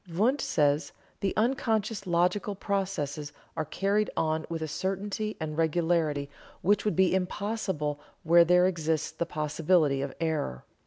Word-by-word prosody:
Wundt 230 - +2
says: 145 -1 +1 0.3
"The 195 - 0
unconscious 220 -3 0
logical 180 +4 +1
processes 185 -8 -2 0.2
are 160 -1 -1
carried 200 +6 0
on 160 0 0
with 165 -1 -3
a - - -2
certainty 195 +5 -3
and 155 -1 -4
regularity 160 -2 +1 0.4
which 205 +4 +3
would 210 - +1
be 190 +1 +4
impossible 190 -5 -2 0.2
where 170 +1 +7
there 180 +1 +5
exists 160 -4 0
the 170 - -3
possibility 155 -2 +1
of 135 -1 -4
error. 155 - -2
170 Hz, 140 wpm, -28 LUFS, 155-195 Hz, 0.4 s, where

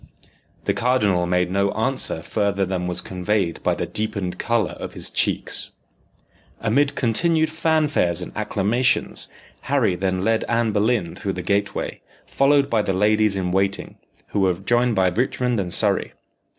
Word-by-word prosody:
The - - +1
cardinal 105 -8 +1
made 90 0 +1
no 100 +1 +1
answer 110 -7 0
further 100 +1 0
than 90 -1 -2
was 90 - -1
conveyed 95 -1 -2
by - - +1
the - - -3
deepened 100 -4 -3
colour 115 -5 0
of - - -8
his - - -5
cheeks. - - -1 0.9
Amid 140 +6 +1
continued 160 +6 +1
fanfares 155 - +1
and 90 - -6
acclamations, 110 +3 +1 0.4
Harry - - +2
then 95 0 -1
led 115 0 +2
Anne 115 -1 +1
Boleyn 105 -4 +1
through 95 - -3
the 90 - -5
gateway, 100 +2 -1 0.2
followed 140 0 +3
by 115 -2 +1
the 95 - -1
ladies 105 +1 +2
in 90 -2 -2
waiting, 95 +1 -1 0.3
who 105 - -1
were 95 -2 +2
joined 120 +5 +1
by 95 -1 +3
Richmond 125 +3 0
and 90 -3 -3
Surrey. - - +3
105 Hz, 150 wpm, -22 LUFS, 95-120 Hz, 0.9 s, followed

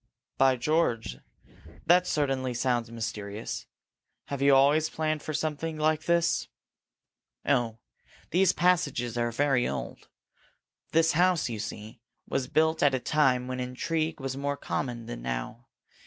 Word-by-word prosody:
"By 135 -1 +5
George, 120 - 0 0.7
that 180 +1 +5
certainly 135 -4 0
sounds 120 -1 0
mysterious! 110 -2 -5 0.6
Have 140 -1 -4
you 140 0 +6
always 145 +4 +4
planned 155 -1 -1
for 155 - -5
something 155 +1 -2
like 155 0 +1
this?" 170 -1 +2 1.0
"Oh, 120 -5 +1 0.5
these 185 +2 +4
passages 145 -9 +1
are 120 0 0
very 135 0 +2
old. - - -5 0.8
This 165 0 +4
house, 180 -2 +2
you 110 -2 -4
see, 110 +1 -7 0.3
was 130 -2 -1
built 160 +1 +2
at 140 -2 +4
a - - -1
time 130 -3 +2
when 130 0 -4
intrigue 155 +6 -2
was 135 -1 -4
more 140 +1 -2
common 120 -6 -3
than - - -7
now. 60 - -5
135 Hz, 135 wpm, -28 LUFS, 120-155 Hz, 1.0 s, you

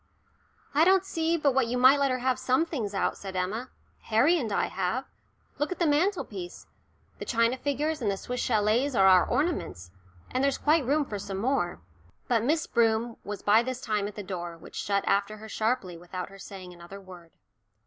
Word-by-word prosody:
"I 300 +3 +5
don't 380 +2 +4
see 330 -2 0
but 285 -4 +2
what 260 -2 +2
you 245 +2 -1
might 260 +3 +6
let 280 -1 +2
her 255 - 0
have 255 0 0
some 260 +6 +2
things 225 -12 -4
out," - - 0
said 195 -1 -7
Emma. 210 +8 -2 0.4
"Harry 245 +10 +4
and 230 -7 -3
I - - +1
have. 190 +8 -2 0.5
Look 295 +3 -1
at 365 - -3
the 345 - +1
mantelpiece 290 - -1 0.5
the - - -5
china 230 +1 +2
figures 290 +3 -2
and 215 - +1
the 195 - -1
Swiss 250 +5 -4
châlets 230 +4 +1
are 195 - +6
our 185 -1 +7
ornaments, 240 - -2 0.4
and 255 - 0
there's 275 -1 +2
quite 300 -3 +2
room 295 +2 +2
for 205 -5 -5
some 195 0 -5
more." 205 - -1 0.5
But 230 -3 +2
Miss 315 +6 +1
Broom 230 0 +1
was 205 0 -6
by 215 +2 +5
this 255 +1 -4
time 210 -5 -1
at 205 - -9
the 205 - -6
door, 175 -3 -5
which - - -14
shut 200 -1 0
after 200 +2 +1
her 220 +1 -10
sharply 220 -6 -1
without 180 +2 -6
her 195 0 -14
saying 185 -2 -9
another 175 +3 -11
word. 180 -3 -14
230 Hz, 200 wpm, -28 LUFS, 195-275 Hz, 0.5 s, our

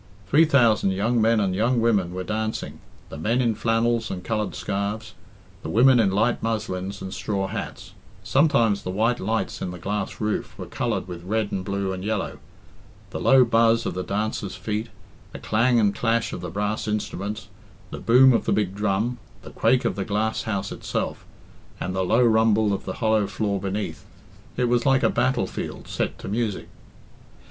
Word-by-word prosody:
Three 150 - +5
thousand 115 -9 +3
young 115 +5 +1
men 115 0 +3
and 95 -3 +1
young 115 +5 +1
women 105 -6 +2
were 95 - -3
dancing, 110 +2 -3 0.3
the 70 - -8
men 115 +9 +1
in 120 -3 +2
flannels 115 +1 0
and 90 -1 -5
coloured 105 -4 -2
scarves, 105 +3 -3 0.5
the - - -6
women 125 +3 +5
in 105 -4 +4
light 110 +5 +1
muslins 100 -4 -3
and 95 0 -6
straw 100 0 -2
hats. - - -6 0.3
Sometimes 115 -8 +3
the 90 - -5
white 110 +6 +1
lights 110 +3 -2
in - - -2
the 90 - -7
glass 100 +2 -3
roof 105 -1 -2
were - - -6
coloured - - -2
with 85 -1 -8
red 105 +2 -1
and 95 - -2
blue 100 0 -2
and 95 0 -6
yellow. 105 -1 -2 0.7
The - - -4
low 130 -2 +6
buzz 115 0 +3
of - - -2
the 90 - -3
dancers' 105 0 -3
feet, 105 +4 -3 0.5
the - - -6
clang 120 +3 +2
and 105 -2 +3
clash 115 0 0
of - - -5
the - - -5
brass 105 +2 -2
instruments, 105 0 -3 0.4
the - - -6
boom 130 +2 +6
of - - +1
the - - +2
big 100 -3 0
drum, 105 +4 -1 0.2
the - - -10
quake 130 -1 +2
of - - 0
the 100 - -2
glass 105 +3 -1
house 100 -1 -2
itself, - - -3 0.6
and 90 +1 -3
the 95 - 0
low 115 +7 +3
rumble 110 -2 +3
of 100 - -4
the 95 - -3
hollow 110 -2 +3
floor 100 0 -2
beneath 100 +2 -4 0.5
it 125 -1 +2
was 120 0 +2
like 135 -1 +3
a - - +4
battle 65 +1 +1
field - - -6
set - - -2
to - - -9
music. 105 0 -2
105 Hz, 190 wpm, -24 LUFS, 100-115 Hz, 0.7 s, low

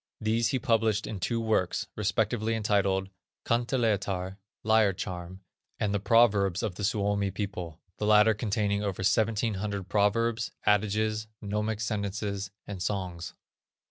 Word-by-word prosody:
These 110 +2 +1
he 130 - 0
published 110 -3 +1
in 105 - -5
two 115 +5 -1
works, 110 -5 0
respectively 110 +2 0
entitled, 100 -3 +1 0.4
Kanteletar 105 -6 0 0.3
(Lyre 110 -2 +4
charm), 90 -1 -6 0.4
and 105 -1 0
The 100 - +1
Proverbs 100 -4 +3
of 105 - -1
the 105 - -7
Suomi 100 -1 +1
People, 95 -5 -5 0.2
the 105 - 0
latter 105 +1 +6
containing 105 -1 0
over 100 -3 -3
1700 105 -1 0
proverbs, 110 +3 +1
adages, 110 +1 +1
gnomic 105 +1 -2
sentences, 100 -2 -2 0.2
and 100 -3 -7
songs. 90 -4 -3
105 Hz, 125 wpm, -28 LUFS, 100-110 Hz, 0.4 s, latter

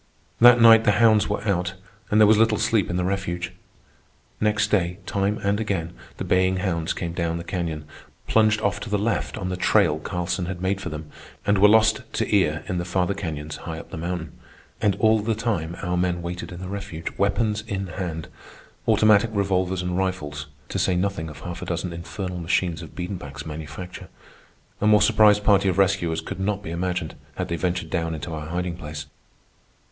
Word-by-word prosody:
That 120 +1 +8
night 115 -1 +8
the 105 - +4
hounds 110 -3 +4
were 105 +1 -2
out, 90 -2 0 0.3
and 105 - +3
there 110 - +8
was 105 +1 +5
little 110 -1 +4
sleep 105 -3 +1
in 90 - -2
the 90 - 0
refuge. 90 -2 -2 0.9
Next 105 0 +1
day, 90 -3 +1
time 100 +1 0
and 100 +1 +1
again, 95 -6 -2 0.2
the - - -4
baying 95 0 +2
hounds 85 -4 -1
came 85 -1 -3
down 85 -1 -1
the 85 - -5
canyon, 85 -4 -3 0.4
plunged 110 0 +3
off 100 -1 0
to 110 - -7
the 105 - +1
left 110 +3 -1
on 90 - -3
the 90 - -2
trail 80 -3 +3
Carlson 90 +2 -2
had 90 -1 -4
made 95 +2 -1
for - - -4
them, 75 0 -7 0.4
and 100 -1 +3
were 105 - +8
lost 110 +3 +4
to - - 0
ear 80 -5 +2
in 90 - -1
the - - -2
farther 90 +2 0
canyons 80 -6 -5
high 80 -1 -6
up - - -10
the - - -6
mountain. 85 0 -4 0.5
And 100 -2 +2
all 110 +2 +4
the 110 +1 -1
time 95 -7 -2
our 90 -1 -1
men 90 -1 0
waited 90 +5 -5
in 90 0 -8
the 95 - -5
refuge, 90 -4 -5
weapons 105 +1 +1
in 100 -2 -2
hand—automatic 95 +5 0
revolvers 95 -3 0
and 90 0 -2
rifles, 75 -7 -3 0.2
to - - -2
say 95 - +2
nothing 90 -3 -1
of 75 - -11
half 90 -1 -6
a - - -4
dozen 85 0 -2
infernal 90 +2 -5
machines 85 0 0
of 80 - -11
Biedenbach's 90 +1 -6
manufacture. 80 +4 -7 0.7
A 105 - +3
more 105 -1 +6
surprised 105 -1 +5
party 100 -2 +4
of 90 - -1
rescuers 90 -4 +2
could 80 - -7
not 100 +1 -1
be 80 - -6
imagined, 90 -1 -2 0.2
had - - -3
they 85 - -1
ventured 85 -1 -2
down 80 -1 -1
into 80 +2 -6
our 75 -1 -5
hiding 90 +1 -2
place. 75 -3 -7
90 Hz, 195 wpm, -24 LUFS, 85-105 Hz, 0.9 s, That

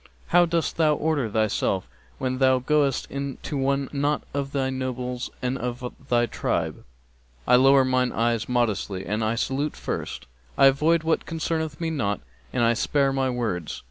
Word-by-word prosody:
'How 175 0 +5
dost 165 -1 -1
thou 155 -2 +4
order 145 -6 0
thyself 105 -3 0 0.3
when 130 0 -2
thou 130 -1 +5
goest 140 0 +1
in 140 -1 -4
to 150 - -4
one 135 0 0
not 145 +1 0
of 140 -1 -2
the 135 -2 0
nobles 125 -1 -3
of 125 -1 -3 0.2
thy 120 -1 +3
tribe?' 115 - -2 0.6
'I - - +6
lower 135 +1 +6
mine 130 -1 +1
eyes 115 -1 0
modestly 105 -6 0
and 105 +2 -1
I 110 +1 +1
salute 135 +5 -1
first; - - -5 0.3
I - - +6
avoid 155 +5 +4
what 160 0 0
concerneth 160 -2 -2
me 165 -1 -1
not 105 -10 -1 0.3
and 120 - +1
I 115 0 +4
spare 135 +4 +1
my 135 -1 +1
words!' 110 -10 -3
130 Hz, 165 wpm, -25 LUFS, 120-145 Hz, 0.6 s, I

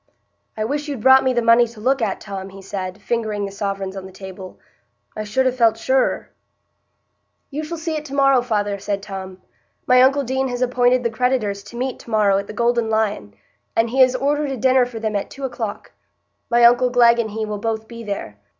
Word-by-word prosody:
"I 215 - -1
wish 290 +5 -3
you'd 280 -6 -5
brought 265 0 +7
me 260 - +2
the 240 -2 0
money 230 +1 +5
to 225 -1 -14
look 260 +4 +1
at, 210 -4 -1
Tom," 195 -2 -7
he 195 0 -12
said, 190 0 -5
fingering 215 -2 -2
the 195 - -6
sovereigns 195 -1 -4
on 190 -1 -7
the - - -13
table; 190 0 -10 0.6
"I 215 - -4
should 235 +5 0
ha' 255 -1 +1
felt 230 -3 +3
surer." 260 +3 0 1.2
"You 300 +3 -4
shall 335 +2 -5
see 325 0 -3
it 305 - -3
to 280 -1 -7
morrow, 275 -2 +4
father," 205 -4 -1
said 200 0 -3
Tom. 190 -2 -8 0.4
"My 250 0 +5
uncle 275 +2 +4
Deane 265 +1 -1
has 245 0 -2
appointed 250 0 +2
the 235 - 0
creditors 225 -4 0
to 235 - -10
meet 255 +1 -3
to - - -14
morrow 205 -3 +3
at 200 - -6
the - - -7
Golden 235 0 +1
Lion, 210 - -1 0.4
and 225 0 +1
he 265 +1 +3
has 255 0 +5
ordered 290 +2 0
a 270 - -3
dinner 255 +1 +3
for 235 -2 -7
them 220 -1 -2
at 200 - -2
two 275 - -10
o'clock. 230 -5 -5 0.6
My 240 0 +3
uncle 245 +1 +6
Glegg 240 -1 +5
and 225 -2 -1
he 220 +1 -3
will 210 -1 -5
both 220 0 -3
be 235 0 -9
there. 200 - -6
230 Hz, 220 wpm, -20 LUFS, 205-255 Hz, 1.2 s, brought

